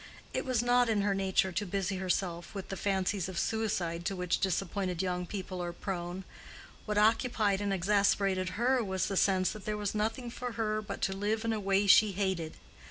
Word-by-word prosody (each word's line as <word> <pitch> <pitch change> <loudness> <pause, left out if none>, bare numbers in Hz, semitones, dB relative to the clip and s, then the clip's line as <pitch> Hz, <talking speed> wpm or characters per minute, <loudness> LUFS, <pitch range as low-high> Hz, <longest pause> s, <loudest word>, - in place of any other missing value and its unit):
It - - -1
was 250 -3 +1
not 245 0 +3
in 215 -2 +2
her 200 0 +1
nature 190 -1 +1
to 195 +4 -1
busy 195 0 -2
herself 180 -1 -2
with 195 - -6
the 195 - -3
fancies 190 -1 0
of 185 - -6
suicide 185 -7 -1
to 195 - -1
which 180 -2 0
disappointed 190 -1 -1
young 180 -1 -2
people 185 -2 -5
are 175 0 -3
prone: 175 0 -5 0.6
what 210 -1 -2
occupied 215 -2 +3
and 200 -1 -1
exasperated 195 -1 +1
her 250 +1 +2
was 190 -2 -1
the 195 - -2
sense 185 -1 +3
that 215 -3 -9
there 215 0 -2
was 205 -1 -2
nothing 225 +3 -2
for 245 0 -5
her 215 -1 -1
but 210 - -6
to 195 - +1
live 215 +3 -1
in 225 - +1
a 220 - -1
way 195 0 +2
she 205 +1 +6
hated. 185 -5 -1
195 Hz, 200 wpm, -31 LUFS, 185-215 Hz, 0.6 s, she